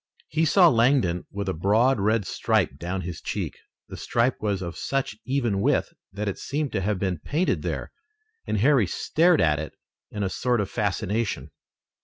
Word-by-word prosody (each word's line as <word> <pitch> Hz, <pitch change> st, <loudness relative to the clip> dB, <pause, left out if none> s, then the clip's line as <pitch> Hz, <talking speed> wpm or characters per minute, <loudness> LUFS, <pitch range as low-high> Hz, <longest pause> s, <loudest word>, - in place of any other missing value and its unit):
He 160 Hz, +1 st, +1 dB
saw 175 Hz, +3 st, +6 dB
Langdon 115 Hz, -, +2 dB
with 100 Hz, -1 st, -5 dB
a 95 Hz, -, 0 dB
broad 110 Hz, +9 st, +2 dB
red 105 Hz, +1 st, +1 dB
stripe 70 Hz, -, 0 dB
down 90 Hz, +3 st, -3 dB
his 85 Hz, -2 st, -6 dB
cheek. -, -, -4 dB, 0.3 s
The -, -, -8 dB
stripe 120 Hz, +2 st, 0 dB
was 100 Hz, -3 st, -1 dB
of 85 Hz, -1 st, -5 dB
such 135 Hz, -5 st, -2 dB
even 120 Hz, -7 st, 0 dB
width -, -, +1 dB, 0.2 s
that 105 Hz, +2 st, -4 dB
it 100 Hz, -, -3 dB
seemed 145 Hz, 0 st, -2 dB
to 95 Hz, -, -1 dB
have 105 Hz, +1 st, 0 dB
been 95 Hz, -3 st, -2 dB
painted 160 Hz, -, 0 dB
there, -, -, -4 dB, 0.6 s
and -, -, 0 dB
Harry 125 Hz, -1 st, +4 dB
stared 165 Hz, -, +2 dB
at 75 Hz, -2 st, +3 dB
it 80 Hz, -, -6 dB, 0.4 s
in 105 Hz, -, -4 dB
a -, -, +1 dB
sort 125 Hz, +4 st, 0 dB
of 100 Hz, -2 st, -2 dB
fascination. 105 Hz, +2 st, -2 dB
105 Hz, 180 wpm, -25 LUFS, 95-130 Hz, 0.6 s, saw